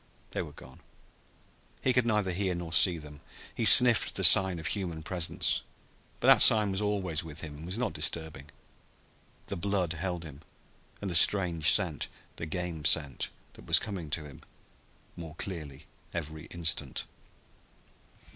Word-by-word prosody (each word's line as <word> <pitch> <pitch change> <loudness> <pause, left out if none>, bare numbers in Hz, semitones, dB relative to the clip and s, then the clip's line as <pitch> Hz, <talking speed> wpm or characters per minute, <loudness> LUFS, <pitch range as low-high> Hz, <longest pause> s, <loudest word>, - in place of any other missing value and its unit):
They - - -3
were - - -9
gone. 65 0 -15 1.0
He 130 - +1
could 125 -1 +1
neither 105 -4 0
hear 95 0 -2
nor 85 -1 -7
see 90 +1 +5
them. 75 -2 -13 0.3
He 115 - -3
sniffed 120 +1 +6
the - - -1
sign 95 -2 +7
of 80 - -9
human 85 -6 -4
presence, 85 -1 -1 0.6
but - - -5
that - - +6
sign 105 -2 +7
was 95 +2 -2
always 95 -6 -2
with 80 -1 -9
him, 75 -3 -9
and 80 - -11
was 90 +4 -5
not 120 -8 -3
disturbing. 80 -2 -4 1.0
The - - -6
blood 90 -2 -2
held 90 +1 -5
him 75 -3 -12 0.6
and 100 - -5
the - - -4
strange 85 -3 +3
scent, 85 -8 +1 0.3
the 80 - -6
game 85 -2 -5
scent 70 -4 +1 0.2
that - - -17
was - - +6
coming 95 -7 -5
to 75 +1 -3
him 70 - -14 0.7
more 80 -2 -10
clearly 80 -6 -8 0.3
every 80 -1 -7
instant. 80 -5 -3
85 Hz, 155 wpm, -28 LUFS, 80-95 Hz, 1.0 s, sign